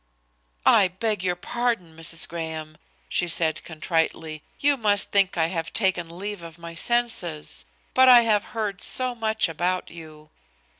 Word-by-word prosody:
"I 195 - +6
beg 205 +2 -2
your 180 -1 0
pardon, 230 -4 -2
Mrs. 165 0 +1
Graham," 160 -1 -6 0.3
she 175 - 0
said 165 -2 +1
contritely; 160 -1 -2 0.2
"you 285 0 +3
must 205 -5 +2
think 195 -3 +2
I 160 - +3
have 165 -2 -3
taken 175 -5 0
leave 205 0 -5
of 165 -1 -11
my 170 0 -9
senses. 185 -7 -1 0.3
But 260 0 +6
I 245 -1 +9
have 215 -3 +1
heard 205 -4 -3
so 255 -1 0
much 220 -3 0
about 175 +3 -2
you." 155 -2 -13
180 Hz, 150 wpm, -24 LUFS, 165-220 Hz, 0.3 s, I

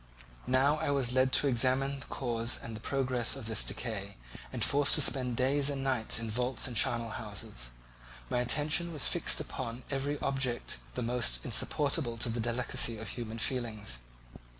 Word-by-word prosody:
Now 135 +4 +3
I - - -2
was 135 -3 +1
led 130 0 +3
to 145 - +4
examine 135 +2 +2
the - - -8
cause 120 -2 -1
and 110 -2 -8
progress 130 -3 0
of 135 -4 -7
this 110 -1 +2
decay 100 -4 -4 0.3
and - - +1
forced 145 0 +6
to 150 - +5
spend 125 -4 +1
days 140 +2 +3
and 140 -1 -3
nights 130 -5 +1
in 115 -1 -4
vaults 125 +3 -1
and 125 - -7
charnel 120 -2 +1
houses. 100 - -5 0.6
My 125 - -1
attention 155 +7 +1
was 145 -5 +1
fixed - - +2
upon 115 +2 -6
every 140 +2 -2
object 130 - -1 0.2
the - - -2
most 115 - 0
insupportable 140 -5 +1
to 115 +1 +2
the 115 +1 -3
delicacy 120 0 0
of 110 -1 -6
the - - -4
human 115 -2 -6
feelings. 110 - -1
125 Hz, 175 wpm, -31 LUFS, 115-135 Hz, 0.6 s, forced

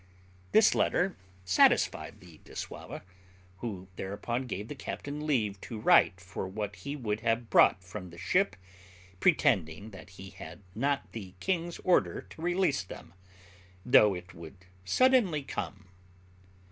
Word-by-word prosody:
This 220 -1 +6
letter 180 +1 +1 0.3
satisfied 90 - +3
the 85 -4 -15
dissauva, - - -7 0.5
who 95 -4 -6
thereupon 120 +6 -3
gave 105 -2 -4
the 145 - -5
captain 145 +2 -6
leave 105 -9 0
to 115 - -7
write 95 -4 +5
for 95 +1 -6
what 105 +1 -4
he 140 +1 -5
would 110 -6 -2
have 115 +1 -1
brought 95 - +5
from 90 0 -8
the 85 - -13
ship, 180 - +1 0.6
pretending 85 +6 +2
that 95 -2 -12
he 95 0 -9
had 85 +4 -11
not 140 +6 -1
the 95 -4 -8
king's 175 -2 -1
order 180 - +2
to - - -11
release 175 -4 +1
them, 85 -3 -11 0.7
though 105 -5 +6
it 90 0 -9
would 85 +2 -12 0.2
suddenly 220 - +3
come. 100 -7 -5
105 Hz, 135 wpm, -30 LUFS, 95-145 Hz, 0.7 s, This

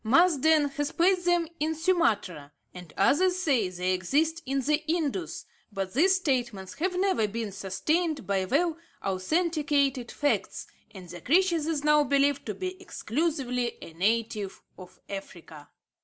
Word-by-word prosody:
Marsden 310 +3 +4
has 290 +2 -3
placed 360 +1 +2
them 350 -1 +2
in 315 +2 0
Sumatra, 225 - 0 0.2
and 180 -3 -11
others 360 - +3
say 270 - +1
they 180 +1 -1
exist 305 - 0
in 275 +1 0
the 300 +3 0
Indus, 330 +1 -2 0.3
but 195 -2 -4
these 370 +9 +4
statements 245 - -2
have 365 +2 -1
never 375 - +2
been 220 0 -4
sustained 285 - -1
by 195 -1 0
well 320 - 0 0.2
authenticated 280 - 0
facts, 290 -1 -1 0.2
and 185 -3 -11
the 175 +1 -9
creature 345 +4 +3
is 310 -2 -2
now 300 0 +5
believed 280 +1 +1
to - - -3
be 370 0 -5
exclusively 250 - -2
a 165 - -11
native 210 +2 -1
of 185 0 -14
Africa. 170 -6 -9
280 Hz, 140 wpm, -27 LUFS, 200-330 Hz, 0.3 s, now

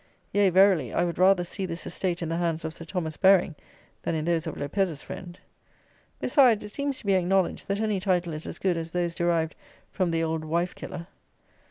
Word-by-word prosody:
Yea, 205 -1 +4
verily, 185 - +4
I - - +1
would 170 0 -4
rather 185 -1 +5
see 190 +2 -4
this 170 0 -5
estate 180 -2 -2
in 165 - -3
the 165 - -1
hands 165 -2 -1
of 160 - -4
Sir 165 - -10
Thomas 160 -3 -3
Baring 190 -3 +5 0.5
than 165 - -2
in 155 -1 -2
those 170 -1 0
of 160 - -5
Lopez's 160 +1 -1
friend. 175 -1 -9 0.8
Besides, 245 -8 +4
it 210 - -7
seems 280 +4 -3
to - - -11
be 200 - +3
acknowledged 185 0 +1
that 200 +1 -1
any 215 -3 0
title 180 -3 0
is 155 +1 -6
as - - -6
good 185 -3 0
as 165 0 -4
those 175 0 -1
derived 170 -2 0 0.4
from 185 -3 0
the 165 0 0
old 160 -1 -1
wife 170 +3 -1
killer. 170 - -7
175 Hz, 210 wpm, -27 LUFS, 165-195 Hz, 0.8 s, rather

